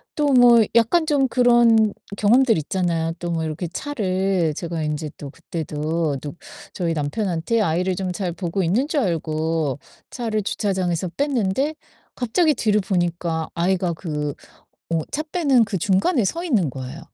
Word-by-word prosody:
또 300 Hz, -1 st, +1 dB
뭐 240 Hz, -2 st, +7 dB
약간 235 Hz, +9 st, +4 dB
좀 285 Hz, -4 st, +2 dB
그런 235 Hz, -4 st, +4 dB, 0.2 s
경험들 230 Hz, +1 st, +4 dB
있잖아요. 165 Hz, 0 st, -1 dB
또 175 Hz, 0 st, -4 dB
뭐 165 Hz, -1 st, -1 dB
이렇게 160 Hz, +3 st, -3 dB
차를 190 Hz, -, -1 dB
제가 165 Hz, -1 st, -4 dB
인제 150 Hz, 0 st, -3 dB
또 140 Hz, -, -8 dB
그때도 155 Hz, -1 st, -3 dB
또 145 Hz, -, -6 dB, 0.4 s
저희 170 Hz, -4 st, -1 dB
남편한테 170 Hz, +7 st, -1 dB
아이를 180 Hz, 0 st, 0 dB
좀 185 Hz, -1 st, -3 dB
잘 180 Hz, -1 st, -2 dB
보고 180 Hz, +2 st, -2 dB
있는 215 Hz, -, +1 dB
줄 305 Hz, -3 st, 0 dB
알고 160 Hz, -, -1 dB, 0.3 s
차를 220 Hz, -4 st, -2 dB
주차장에서 185 Hz, -4 st, -1 dB
뺐는데 275 Hz, +1 st, 0 dB, 0.4 s
갑자기 300 Hz, +7 st, +2 dB
뒤를 210 Hz, -1 st, +2 dB
보니까 175 Hz, -3 st, -1 dB
아이가 180 Hz, +1 st, +1 dB
그 150 Hz, -4 st, -4 dB, 0.6 s
어 165 Hz, -, +1 dB
차 305 Hz, -, -1 dB
빼는 300 Hz, -7 st, +2 dB
그 205 Hz, -, -3 dB
중간에 200 Hz, -, +2 dB
서 335 Hz, -, -2 dB
있는 210 Hz, -, +1 dB
거에요. 130 Hz, +4 st, -7 dB
185 Hz, 295 characters per minute, -22 LUFS, 165-235 Hz, 0.6 s, 뭐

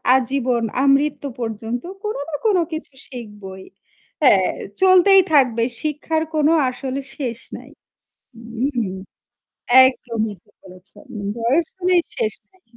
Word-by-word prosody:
আজীবন 255 Hz, -2 st, 0 dB, 0.2 s
আমৃত্যু 280 Hz, +1 st, +2 dB
পর্যন্ত 225 Hz, +1 st, -4 dB, 0.2 s
কোন 425 Hz, -, -3 dB
না 310 Hz, -, -3 dB
কোন 415 Hz, -4 st, +4 dB, 0.2 s
কিছু 315 Hz, -3 st, -6 dB, 0.2 s
শিখবই। 210 Hz, -6 st, -9 dB, 0.6 s
হ্যাঁ 195 Hz, -8 st, +5 dB, 0.3 s
চলতেই 380 Hz, +1 st, +6 dB
থাকবে 250 Hz, -5 st, +4 dB, 0.2 s
শিক্ষার 310 Hz, +1 st, -1 dB
কোনো 305 Hz, +1 st, +3 dB, 0.2 s
আসলে 260 Hz, +1 st, -5 dB, 0.2 s
শেষ 245 Hz, -5 st, -4 dB, 0.2 s
নাই। -, -, -13 dB, 0.7 s
হুম, 235 Hz, 0 st, -3 dB, 1.0 s
একদমই 230 Hz, -4 st, -2 dB
ঠিক -, -, -31 dB
বলেছেন। 185 Hz, +7 st, -15 dB, 0.3 s
বয়স 265 Hz, +9 st, +1 dB
হলেই 360 Hz, -1 st, +2 dB
শেষ 455 Hz, -3 st, -1 dB, 0.2 s
নাই। 375 Hz, -1 st, -31 dB
260 Hz, 115 wpm, -20 LUFS, 230-310 Hz, 1.0 s, চলতেই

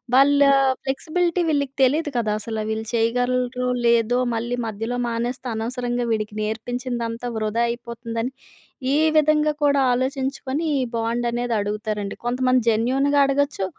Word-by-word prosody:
వాళ్ళ 280 Hz, +2 st, +5 dB, 0.4 s
ఫ్లెక్సిబిలిటీ 335 Hz, +6 st, 0 dB
వీళ్ళకి 280 Hz, -3 st, 0 dB
తెలీదు 295 Hz, +4 st, +2 dB
కదా! 220 Hz, -3 st, 0 dB
అసలు 220 Hz, 0 st, -4 dB
వీళ్ళు 220 Hz, 0 st, -3 dB
చేయగలరో 250 Hz, +2 st, 0 dB, 0.2 s
లేదో 235 Hz, +1 st, +3 dB, 0.2 s
మళ్ళీ 240 Hz, +2 st, -2 dB
మధ్యలో 225 Hz, +3 st, -3 dB
మానేస్తే 240 Hz, +2 st, -3 dB
అనవసరంగా 245 Hz, +1 st, -2 dB
వీడికి 215 Hz, -1 st, -2 dB
నేర్పించిందంతా 235 Hz, +2 st, -3 dB
వృధా 220 Hz, +2 st, 0 dB
అయిపోతుందని 235 Hz, 0 st, -4 dB, 0.6 s
ఈ -, -, +3 dB, 0.2 s
విధంగా 305 Hz, 0 st, +3 dB
కూడా 280 Hz, -1 st, +4 dB
ఆలోచించుకొని 265 Hz, +3 st, -2 dB, 0.2 s
ఈ -, -, +1 dB
బాండ్ 230 Hz, +1 st, -1 dB
అనేది 240 Hz, 0 st, -1 dB
అడుగుతారండి. 210 Hz, 0 st, -3 dB
కొంతమంది 255 Hz, +1 st, +2 dB
జెన్యూన్‌గా 265 Hz, +6 st, +2 dB
అడగొచ్చు. 275 Hz, -6 st, 0 dB
245 Hz, 120 wpm, -22 LUFS, 230-265 Hz, 0.6 s, వాళ్ళ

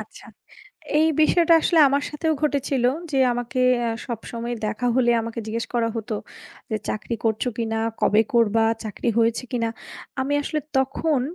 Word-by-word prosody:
আচ্ছা। -, -, -12 dB, 0.7 s
এই 320 Hz, -, +4 dB
বিষয়টা 335 Hz, +1 st, +4 dB
আসলে 330 Hz, -, +3 dB
আমার 280 Hz, +1 st, +1 dB
সাথেও 315 Hz, +1 st, -1 dB
ঘটেছিল। 280 Hz, -3 st, 0 dB, 0.3 s
যে 270 Hz, -, 0 dB, 0.2 s
আমাকে 245 Hz, +1 st, -3 dB, 0.2 s
অ্যা 235 Hz, -, 0 dB, 0.2 s
সবসময় 235 Hz, 0 st, -5 dB
দেখা 225 Hz, +4 st, -2 dB
হলে 240 Hz, -2 st, +3 dB
আমাকে 230 Hz, +1 st, -5 dB
জিজ্ঞেস 230 Hz, +1 st, -2 dB
করা 230 Hz, -1 st, +1 dB
হত 225 Hz, +1 st, -5 dB, 0.6 s
যে" -, -, +1 dB
চাকরি 230 Hz, +2 st, -3 dB
করছো 220 Hz, +2 st, 0 dB
কিনা? 225 Hz, -1 st, -1 dB, 0.2 s
কবে 215 Hz, +2 st, +4 dB
করবা? 225 Hz, -1 st, +3 dB, 0.2 s
চাকরি 220 Hz, +3 st, -3 dB
হয়েছে 230 Hz, +2 st, +1 dB
কিনা?" 230 Hz, -2 st, 0 dB, 0.5 s
আমি 280 Hz, +2 st, -1 dB
আসলে 305 Hz, +1 st, -2 dB, 0.2 s
তখন 270 Hz, +1 st, +1 dB
240 Hz, 155 wpm, -23 LUFS, 230-280 Hz, 0.7 s, এই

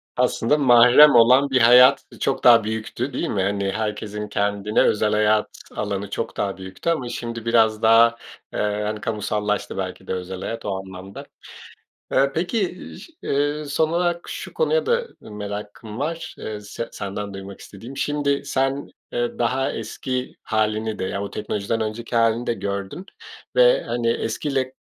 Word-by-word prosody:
Aslında 125 Hz, +2 st, +2 dB
mahrem 125 Hz, +2 st, +7 dB
olan 125 Hz, +4 st, +6 dB
bir 130 Hz, -2 st, +2 dB
hayat, 125 Hz, +3 st, +7 dB
ııı, -, -, -14 dB
çok 135 Hz, -, -1 dB
daha 115 Hz, -2 st, +7 dB
büyüktü, 110 Hz, +4 st, -4 dB
değil -, -, -2 dB
mi? 100 Hz, -, -1 dB
Hani, 100 Hz, 0 st, -1 dB
herkesin 105 Hz, -1 st, -4 dB
kendine 100 Hz, 0 st, 0 dB
özel 105 Hz, 0 st, +2 dB
hayat 105 Hz, 0 st, +3 dB, 0.3 s
alanı 100 Hz, -1 st, -3 dB
çok -, -, -4 dB
daha 100 Hz, -1 st, -2 dB
büyüktü 95 Hz, -, -5 dB
ama 130 Hz, -8 st, -1 dB
şimdi 115 Hz, -1 st, -5 dB
biraz 110 Hz, -2 st, +3 dB
daha, 115 Hz, +1 st, +5 dB, 0.4 s
eee, -, -, -3 dB, 0.2 s
hani, 105 Hz, 0 st, -3 dB
kamusallaştı 105 Hz, -2 st, -2 dB
belki 95 Hz, 0 st, -5 dB
de -, -, -2 dB
özel 90 Hz, 0 st, -5 dB
hayat 115 Hz, 0 st, -5 dB
o 100 Hz, -2 st, -1 dB
anlamda. 95 Hz, 0 st, -10 dB, 0.9 s
Eee, 135 Hz, +1 st, +3 dB
peki, 180 Hz, +2 st, -1 dB, 0.2 s
ş 330 Hz, -, -14 dB
eee, 145 Hz, +2 st, -1 dB
son 150 Hz, +2 st, 0 dB
olarak 175 Hz, 0 st, -1 dB
şu -, -, -7 dB
konuya 480 Hz, 0 st, +1 dB
da 475 Hz, 0 st, +1 dB
merakım 105 Hz, +1 st, -7 dB
var, 165 Hz, +3 st, -4 dB
eee, 105 Hz, -1 st, -6 dB
se 110 Hz, +3 st, -6 dB
senden 100 Hz, 0 st, -5 dB
duymak 95 Hz, 0 st, -9 dB
istediğim. 115 Hz, +7 st, -11 dB
Şimdi, 145 Hz, -1 st, 0 dB
sen, 135 Hz, +1 st, -1 dB, 0.2 s
eee, 120 Hz, 0 st, -2 dB
daha 130 Hz, +3 st, 0 dB
eski 125 Hz, +3 st, -4 dB
hâlini 110 Hz, 0 st, -1 dB
de, -, -, -2 dB
yani 100 Hz, +2 st, -3 dB
o 100 Hz, -, -6 dB
teknolojiden 105 Hz, +2 st, -3 dB
önceki 115 Hz, +2 st, -3 dB
hâlini 115 Hz, +1 st, +2 dB
de 120 Hz, -, 0 dB
gördün 100 Hz, -, -5 dB, 0.5 s
ve, -, -, +5 dB
hani, 120 Hz, -1 st, -1 dB
eskiyle 130 Hz, +3 st, -2 dB
115 Hz, 160 wpm, -22 LUFS, 105-135 Hz, 0.9 s, mahrem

